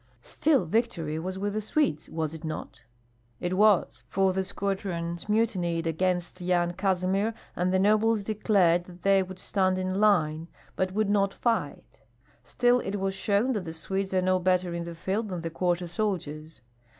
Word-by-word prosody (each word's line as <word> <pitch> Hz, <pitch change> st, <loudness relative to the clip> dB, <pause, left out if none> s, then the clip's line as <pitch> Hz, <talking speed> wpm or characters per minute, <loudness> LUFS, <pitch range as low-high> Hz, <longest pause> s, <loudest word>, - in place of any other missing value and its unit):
"Still 290 Hz, -, +1 dB
victory 165 Hz, -6 st, -1 dB
was 185 Hz, +3 st, -4 dB
with 200 Hz, +1 st, -2 dB
the 215 Hz, -, -1 dB
Swedes, 215 Hz, -, 0 dB
was 160 Hz, -1 st, -3 dB
it 160 Hz, -, -9 dB
not?" 155 Hz, -5 st, -6 dB, 0.6 s
"It 180 Hz, +1 st, -2 dB
was, 190 Hz, -, +3 dB
for 190 Hz, +4 st, +2 dB
the 190 Hz, +1 st, 0 dB
squadrons 185 Hz, -3 st, -3 dB
mutinied 185 Hz, -7 st, +1 dB
against 180 Hz, +2 st, -1 dB
Yan 175 Hz, -1 st, +1 dB
Kazimir, 190 Hz, +3 st, 0 dB, 0.2 s
and 180 Hz, +1 st, 0 dB
the 190 Hz, -, +3 dB
nobles 215 Hz, +2 st, +3 dB
declared 195 Hz, -5 st, +2 dB
that 180 Hz, -1 st, -14 dB
they 195 Hz, 0 st, +4 dB
would 185 Hz, 0 st, -6 dB
stand 185 Hz, 0 st, 0 dB
in 185 Hz, +1 st, -1 dB
line, 165 Hz, -6 st, +2 dB, 0.3 s
but 185 Hz, 0 st, 0 dB
would 205 Hz, +1 st, 0 dB
not 200 Hz, -1 st, +2 dB
fight. 225 Hz, -, -2 dB, 0.4 s
Still 245 Hz, -, +2 dB
it 200 Hz, -3 st, -3 dB
was 195 Hz, -1 st, -1 dB
shown 205 Hz, +5 st, +1 dB
that 210 Hz, -7 st, -2 dB
the 160 Hz, 0 st, -6 dB
Swedes 190 Hz, +4 st, -2 dB
are 185 Hz, -1 st, +1 dB
no 185 Hz, 0 st, +2 dB
better 180 Hz, -1 st, +1 dB
in 170 Hz, 0 st, -3 dB
the 170 Hz, 0 st, -7 dB
field 195 Hz, +6 st, -2 dB
than 180 Hz, -3 st, -4 dB
the 165 Hz, 0 st, -4 dB
quarter 175 Hz, +1 st, 0 dB
soldiers. 160 Hz, -, -3 dB
185 Hz, 175 wpm, -27 LUFS, 170-205 Hz, 0.6 s, they